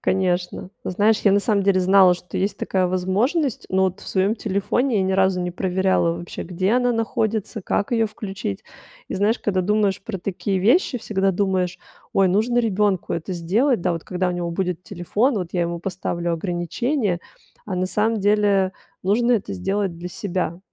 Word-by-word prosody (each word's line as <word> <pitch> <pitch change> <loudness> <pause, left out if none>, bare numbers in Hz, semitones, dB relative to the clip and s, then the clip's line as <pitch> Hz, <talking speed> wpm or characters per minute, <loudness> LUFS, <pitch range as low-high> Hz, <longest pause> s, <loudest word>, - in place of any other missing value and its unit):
Конечно. 180 -1 -1
Ну, - - -2
знаешь, 210 +4 +3
я, 200 - +6
на 200 - +4
самом 200 -2 +1
деле, 190 -2 +3
знала, 185 -1 +6
что 180 - -7
есть 195 +1 -1
такая 185 -1 0
возможность, 210 - 0
но 190 0 +3
вот 190 +1 -2
в - - -13
своеём 195 +4 +1
телефоне 215 +5 0
я 190 - +2
ни 190 - 0
разу 190 -1 +2
не 180 0 -2
проверяла 185 -1 +1
вообще, 170 0 -7
где 185 +4 -1
она 245 0 +3
находится, 220 -1 -1
как 200 - -1
её 225 -2 +2
включить. 195 - -5 0.5
И - - -4
знаешь, 210 +4 +1
када 190 -3 0
думаешь 205 0 +1
про 200 -3 -5
такие 190 +1 -2
вещи, 250 - +3
всегда 195 -3 0
думаешь: 185 -2 0 0.3
"Ой, 195 -1 +4
нужно 225 +6 +2
ребёнку 205 -4 +1
это 170 +3 -4
сделать, 205 - +1
да. - - 0
Вот 165 -1 -5
когда 180 0 -1
у - - -1
него 175 -1 -3
будет 180 -1 -2
телефон, 205 - 0
вот 180 - -3
я 175 - +1
ему 170 0 -3
поставлю 175 -2 -2
ограничение". 180 - -1 0.5
А 200 - -4
на 185 0 0
самом 215 +3 0
деле 200 -2 +3 0.3
нужно 235 +6 +2
это 210 - 0
сделать 190 - -1
для 175 +1 -6
себя. 180 -2 -3
190 Hz, 185 wpm, -22 LUFS, 180-210 Hz, 0.5 s, я